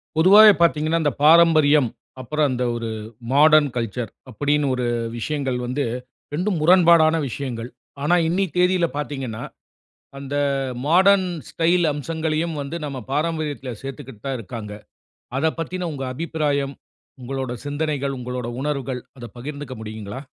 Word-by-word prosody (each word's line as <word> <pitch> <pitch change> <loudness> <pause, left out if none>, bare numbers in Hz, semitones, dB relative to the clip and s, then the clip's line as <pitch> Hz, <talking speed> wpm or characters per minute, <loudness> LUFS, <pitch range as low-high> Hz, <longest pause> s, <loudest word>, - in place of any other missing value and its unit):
பொதுவாவே 205 +6 +8
பாத்தீங்கன்னா, 165 0 +2
இந்த 145 - +2
பாரம்பரியம், 155 -4 +6 0.3
அப்புறம் 150 +3 0
அந்த 125 0 -1
ஒரு 115 -1 -4 0.4
மாடர்ன் 150 0 +6
கல்ச்சர், 115 -1 -3 0.2
அப்டீன்னு 145 +4 +1
ஒரு 125 -1 -2 0.3
விஷயங்கள் 135 0 -2
வந்து, 130 +4 -1 0.5
இரண்டும் 180 +4 -1
முரண்பாடான 170 -1 +6
விஷயங்கள். 120 -2 -5 0.3
ஆனா, 175 +4 +3
இன்னி 185 +4 +1
தேதியில 180 -1 +3
பாத்தீங்கன்னா, 135 -6 -4 0.8
அந்த 140 0 -6 0.5
மாடர்ன் 190 +3 +5 0.2
ஸ்டைல் 170 +1 +2
அம்சங்களையும் 160 +2 -2
வந்து, 140 +4 -5
நம்ப 135 -3 -5
பாரம்பரியத்தில 150 -3 -2
சேர்த்துக்கிட்டு 135 -5 -9
தான் 135 -2 -2
இருக்காங்க. 105 0 -7 0.7
அத 140 - 0
பத்தின 180 +2 -3
உங்க 135 -2 -5
அபிப்பிராயம், 145 -2 -1 0.5
உங்களோட 130 0 -4
சிந்தனைகள், 145 -2 -2
உங்களோட 125 -1 -4
உணர்வுகள் 135 -3 -3 0.2
அத 120 - -8
பகிர்ந்துக்க 140 +1 -6
முடியுங்களா? 110 +2 -7
145 Hz, 120 wpm, -22 LUFS, 130-165 Hz, 0.8 s, பொதுவாவே